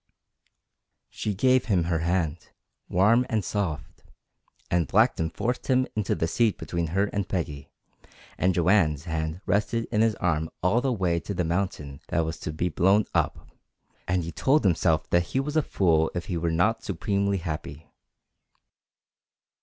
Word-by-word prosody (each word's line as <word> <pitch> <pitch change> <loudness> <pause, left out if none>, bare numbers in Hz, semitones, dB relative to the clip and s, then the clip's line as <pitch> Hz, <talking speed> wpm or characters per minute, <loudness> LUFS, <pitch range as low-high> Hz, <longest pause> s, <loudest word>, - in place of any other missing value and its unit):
She 105 -2 -3
gave 130 +4 +3
him 95 -6 +2
her 85 -1 0
hand, 85 -1 -1 0.4
warm 105 +7 +4
and 110 -4 0
soft; 90 -9 -3 0.7
and 85 -3 +2
Blackton 80 +4 +2
forced 120 +10 -3
him 130 -1 +3
into 105 -2 0
the 80 - -1
seat 110 +5 +1
between 85 -1 -3
her 95 +6 +1
and 100 -2 -2
Peggy, 75 -7 -4 0.7
and 90 -1 +1
Joanne's 85 -5 +3
hand 80 +1 -3
rested 115 +3 0
in 110 -2 +2
his 110 -1 +2
arm 80 -3 -1
all 105 +7 +3
the 135 0 0
way 90 -7 0
to 100 +4 -6
the 90 - 0
mountain 80 -5 -3
that 85 - +1
was 80 +1 -5
to - - -4
be 80 +3 -1
blown 95 +5 +3
up, - - -1 0.6
and 90 -1 0
he 85 - -5
told 135 - +2
himself 80 -4 +2
that 85 - +4 0.2
he - - +4
was 145 +3 -3
a 155 - +4
fool 80 - +2
if 85 -1 -3
he 90 - -3
were 85 0 -1
not 90 +8 +1
supremely 100 +2 -1
happy. 80 -3 -6
90 Hz, 160 wpm, -26 LUFS, 80-105 Hz, 0.7 s, warm